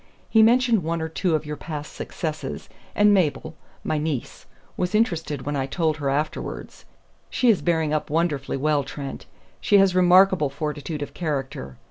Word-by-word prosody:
He 220 - +4
mentioned 235 -1 +4
one 165 +1 -2
or 160 - -2
two 165 +1 0
of 155 - -2
your 150 0 -4
past 150 -1 -7
successes, 155 -2 -5 0.3
and 205 0 +5
Mabel 160 -3 0 0.3
my 155 - -1
niece 150 -5 -4 0.3
was 180 +3 -1
interested 165 - 0
when 145 +1 -3
I 135 -1 -1
told 155 +1 0
her 140 -3 -2
afterwards. 150 +3 -4 0.4
She 245 -2 +3
is 205 - 0
bearing 160 -3 +1
up 155 - -1
wonderfully 150 -4 -1
well, 145 +1 +1
Trent; 140 +1 -7 0.3
she 205 - +4
has 195 -2 +4
remarkable 185 -3 +5
fortitude 150 +1 -4
of - - -9
character. 135 - -4
155 Hz, 165 wpm, -24 LUFS, 145-180 Hz, 0.4 s, and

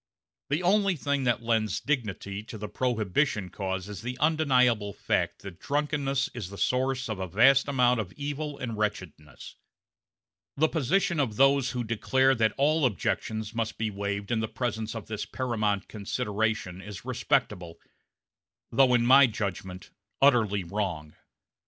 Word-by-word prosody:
The 150 +5 0
only 195 +1 +3
thing 140 -2 -1
that 120 -1 +1
lends 110 -2 0
dignity 105 - -3
to 110 - -8
the 105 0 -5
Prohibition 110 - 0
cause 95 -1 -4
is 105 -1 -7
the 125 +2 -5
undeniable 125 -9 +2
fact - - -1
that 95 -2 -9
drunkenness 140 -2 -1
is 110 -7 -6
the 100 - -9
source 130 +2 0
of 110 -4 -4
a 95 - -3
vast 130 +9 +4
amount 125 -3 +3
of 100 -5 -4
evil 145 0 -4
and 120 -3 -4
wretchedness; 90 -9 -5 1.0
the 160 +3 +4
position 170 +3 +1
of 120 -7 0
those 135 +1 +4
who 125 -2 -3
declare 130 +4 +2
that 110 -4 +1
all 150 +3 +2
objections 110 0 -3
must 115 -1 -3
be 110 0 -2
waived 100 +1 -4
in 115 - +1
the 110 - -1
presence 110 -2 -3
of 110 - -6
this 110 -1 -5
paramount 110 -6 -1
consideration 105 -3 -2
is 100 0 -9
respectable, 85 -2 -1 0.9
though 130 -2 +4
in 120 -1 +2
my 130 +2 +7
judgment 95 -4 -5 0.3
utterly 110 -8 +3
wrong. 85 -5 -4
115 Hz, 150 wpm, -27 LUFS, 100-135 Hz, 1.0 s, my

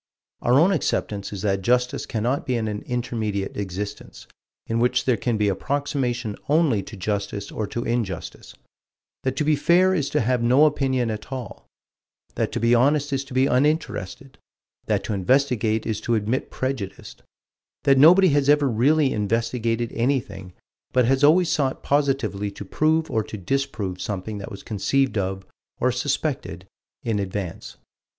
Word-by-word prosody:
Our 125 +3 +4
own 175 +5 +5
acceptance 105 - -1
is 100 -1 -6
that 100 -2 0
justice 125 +4 +1
cannot 120 +6 -1
be 130 - +1
in 110 -2 -1
an 105 -1 -4
intermediate 110 -5 -2
existence, 100 +1 -6 0.4
in 115 0 -1
which 125 +1 +2
there 125 - +3
can 115 +2 -1
be 105 -1 +1
approximation 125 0 -1
only 150 -9 +3
to 105 - -10
justice 100 +1 -3
or 110 - -3
to 120 - -4
injustice; 105 -9 -4 0.7
that 130 0 -1
to 150 - 0
be 150 0 +3
fair 180 +5 +4
is 150 -7 0
to 150 - +1
have 125 +1 +1
no 130 +6 +5
opinion 130 -5 +1
at 110 +4 -7
all; 125 -6 -7 0.7
that - - -1
to - - -1
be 115 +1 +3
honest 140 +4 +3
is 135 0 0
to 135 -2 -10
be 130 +1 +4
uninterested; 135 - -1 0.5
that - - +1
to 110 - -3
investigate 110 +1 +1
is 110 -2 -2
to 120 - 0
admit 110 +4 -1
prejudice; 130 -8 -4 0.7
that 135 -1 +4
nobody 180 +6 +7
has 145 -1 +2
ever 145 -1 +4
really 135 +5 +2
investigated 115 +2 -1
anything, 115 -7 -2 0.4
but 125 -2 +3
has 135 +3 +2
always 165 +4 +5
sought 135 -3 -1
positively 135 -9 0
to 100 - -9
prove 155 +9 +1
or 110 - +1
to 110 - -8
disprove 100 -4 -2
something 105 +1 -4
that 100 - -7
was 100 - -9
conceived 130 +6 0
of, 95 -1 -2 0.3
or - - +2
suspected, - - -2 0.4
in 110 -3 -1
advance. 95 -3 -5
120 Hz, 160 wpm, -23 LUFS, 105-135 Hz, 0.7 s, nobody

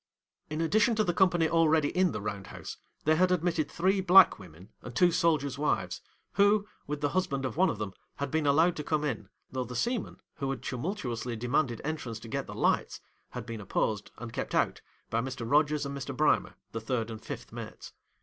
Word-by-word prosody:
'In 155 +1 -2
addition 215 +7 +3
to 215 - +3
the 175 -4 0
company 175 -3 +3
already 160 -2 +3
in 185 -1 +3
the 105 - -4
round 100 -2 -4
house, - - -8 0.3
they 155 +1 +4
had 180 +2 +3
admitted 170 -3 +1
three 190 +3 +1
black 190 +1 +7
women 90 +3 -13
and 125 - -9
two 180 -1 +5
soldiers' 150 -6 +1
wives; 150 - 0 0.3
who, 205 +1 +3 0.2
with 150 0 -3
the 145 - +2
husband 170 -6 -1
of 130 - -3
one 185 +4 +4
of - - -2
them, 105 -2 -4 0.2
had 140 -1 -3
been 155 -2 +1
allowed 160 +5 +4
to 150 - -3
come 150 0 0
in, 135 -7 -3 0.2
though 130 -1 -1
the 125 0 -8
seamen, 240 - -1 0.2
who 135 -3 -2
had 130 -3 -4
tumultuously 125 - -3
demanded 120 +1 0
entrance 140 -7 -3
to 115 - -9
get 110 - -3
the - - -7
lights, - - +1 0.3
had 125 -2 -6
been 115 -2 -6
opposed 105 +1 -1
and 120 -2 -7
kept - - -3
out - - +1 0.3
by 115 - +1
Mr. 125 -2 -5
Rogers 150 +2 +3
and 140 0 -4
Mr. 135 -2 -5
Brimer, - - +2 0.2
the 115 - -4
third 115 0 -2
and 110 - -7
fifth - - -7
mates. - - -8
145 Hz, 205 wpm, -30 LUFS, 120-175 Hz, 0.3 s, black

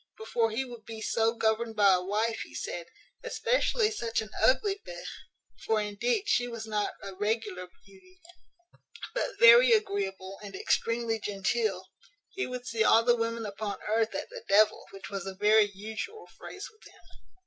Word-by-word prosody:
"Before 235 - 0
he 235 +5 -2
would 240 -3 -11
be 225 0 -8
so 225 +1 +1
governed 225 0 0
by 200 -2 +5
a 180 - +2
wife, 215 +5 -1
he - - -9
said, 170 -1 -5 0.4
especially 470 -2 +1
such 235 - -2
an 215 -1 -5
ugly 395 +9 +3
b - - -8 0.7
(for, 220 -1 +1
indeed, 210 - -1
she 245 0 +2
was 230 -2 -6
not 210 -2 -2
a 195 - -7
regular 205 -2 -2 0.2
beauty, 200 - -20 0.9
but - - -2
very 485 0 +8
agreeable 195 - -1
and 200 -2 -9
extremely 230 +3 0
genteel), 205 -1 -1 0.5
he 390 - -3
would 250 -1 -6
see 225 -2 0
all 225 +1 +5
the 240 0 +4
women 230 -1 -2
upon 205 0 -4
earth 220 -1 0
at - - -5
the - - -8
devil, 210 +2 +4
which 195 0 -10
was 195 -2 -4
a 190 - -5
very 210 +1 +4
usual 220 - -7
phrase - - -8
with 435 - -25
him. - - -21
220 Hz, 170 wpm, -29 LUFS, 200-240 Hz, 0.9 s, very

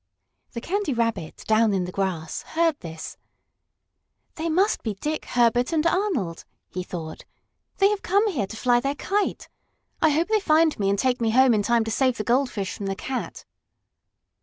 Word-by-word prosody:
The 235 - -5
Candy 380 - -1
Rabbit, 230 -9 -2
down 220 -1 +3
in 185 - 0
the 180 - -6
grass, 180 -5 -3 0.2
heard 330 -3 +2
this. 160 -2 -8 1.2
"They 330 +1 -3
must 380 +6 +2
be 220 -3 -3
Dick, 300 +10 -3
Herbert 240 +2 +2
and 320 -1 +1
Arnold," 335 - 0 0.3
he 185 - -3
thought. 165 -3 -7 0.5
"They 395 0 +5
have 415 -1 -1
come 400 +4 +2
here 230 - -2
to 220 - -8
fly 245 +1 +3
their 275 +3 -2
kite. 400 +7 -1 0.5
I 315 - +5
hope 320 +6 +1
they 435 -1 +3
find 315 - +3
me 195 -1 +1
and 200 - +1
take 250 +2 +1
me 225 - +2
home 255 +2 +5
in 210 - +2
time 235 +2 +2
to 225 - -4
save 255 +1 +1
the 215 - -2
goldfish 235 -5 0
from 200 - -5
the 195 - -2
cat." 260 +5 -5
245 Hz, 185 wpm, -24 LUFS, 200-320 Hz, 1.2 s, They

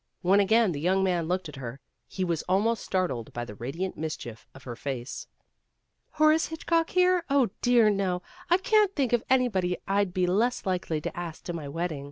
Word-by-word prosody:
When 190 +3 +4
again 220 +1 +4
the 145 - -4
young 190 +5 +2
man 175 -3 0
looked 180 0 -1
at 150 -2 -10
her, 130 0 -7 0.3
he 190 - -3
was 170 -3 -1
almost 215 +4 +2
startled 175 -12 -2
by 120 0 -4
the 105 - -9
radiant 145 - -4
mischief 135 -7 -6
of 135 - -13
her 120 -2 -6
face. 130 -1 -5 0.9
"Horace 310 +1 +4
Hitchcock 330 +1 0
here? 365 -1 +3
Oh, 270 -7 +3
dear, 245 -3 +5
no! 185 -3 -1 0.3
I 350 - +5
can't 425 -1 +2
think 265 -5 0
of 240 - +3
anybody 205 -9 +2
I'd 200 -1 +1
be 180 0 +1
less 220 +8 +1
likely 175 -4 -1
to - - -5
ask 170 -2 -6
to 175 - -5
my 160 -4 -5
wedding. 165 0 -3
185 Hz, 195 wpm, -27 LUFS, 160-240 Hz, 0.9 s, dear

